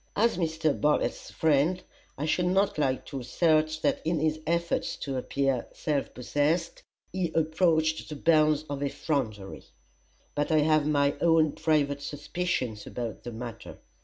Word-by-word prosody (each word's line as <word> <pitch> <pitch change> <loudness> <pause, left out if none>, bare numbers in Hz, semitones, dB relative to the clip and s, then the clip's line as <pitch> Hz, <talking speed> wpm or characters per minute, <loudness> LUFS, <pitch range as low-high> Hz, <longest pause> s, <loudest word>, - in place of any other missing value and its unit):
As 230 0 +3
Mr. 160 -3 0
Bartlett's 150 0 +1
friend, 160 +4 +1 0.3
I 145 - -2
should 175 +3 +1
not 190 -2 +1
like 130 -3 0
to 135 - -6
assert 155 +4 +1
that - - +1
in 165 0 0
his 155 0 0
efforts 170 +1 0
to 135 -2 -5
appear 135 -1 -1
self 145 -3 -2
possessed 145 +7 0 0.3
he 180 -3 -1
approached 160 -1 +1
the 150 - -5
bounds 155 0 +3
of 140 -1 -4
effrontery; 125 -8 -3 0.7
but 145 +2 -1
I 155 -1 +4
have 155 -1 +3
my 145 -1 +2
own 165 -2 +4
private 145 -3 0
suspicions 145 - -3
about 115 -3 -5
the 120 - -7
matter. 115 0 -8
155 Hz, 145 wpm, -28 LUFS, 140-160 Hz, 0.7 s, I